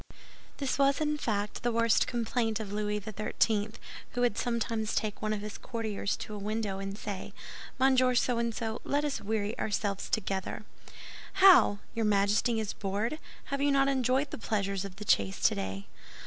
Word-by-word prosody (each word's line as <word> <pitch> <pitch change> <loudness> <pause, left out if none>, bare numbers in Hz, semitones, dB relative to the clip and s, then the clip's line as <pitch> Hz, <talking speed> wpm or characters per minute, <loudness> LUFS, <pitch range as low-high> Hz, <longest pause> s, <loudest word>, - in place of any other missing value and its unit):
This 275 -1 -1
was, 275 0 +4
in 300 -1 0
fact, 210 -4 -2
the 240 - +1
worst 230 0 +3
complaint 230 -2 -1
of 205 -2 -5
Louis 210 0 -1
XIII., 215 +1 0 0.4
who 245 - -1
would 245 -4 +2
sometimes 230 -2 -1
take 215 -2 -1
one 215 - -1
of 210 -1 -1
his 210 0 -7
courtiers 220 -4 -2
to 215 - -6
a 210 - -5
window 210 -1 -2
and 195 0 -5
say, 205 -3 -6 0.4
"Monsieur 255 -1 +4
So 240 0 +2
and 235 0 0
so, 225 0 -4
let 290 +1 0
us 290 - -2
weary 210 +1 -1
ourselves 205 -2 -1
together." 195 -1 -2 0.7
"How! 375 - +7 0.2
Your 230 -2 0
Majesty 210 +3 +2
is 215 -2 -2
bored? 210 +9 -2 0.3
Have 280 - 0
you 285 - +3
not 275 0 +4
enjoyed 265 +1 +1
the - - -5
pleasures 200 -3 -1
of 195 -2 -8
the 210 +2 -8
chase 100 - +2
today?" 95 0 0
220 Hz, 175 wpm, -30 LUFS, 205-245 Hz, 0.7 s, How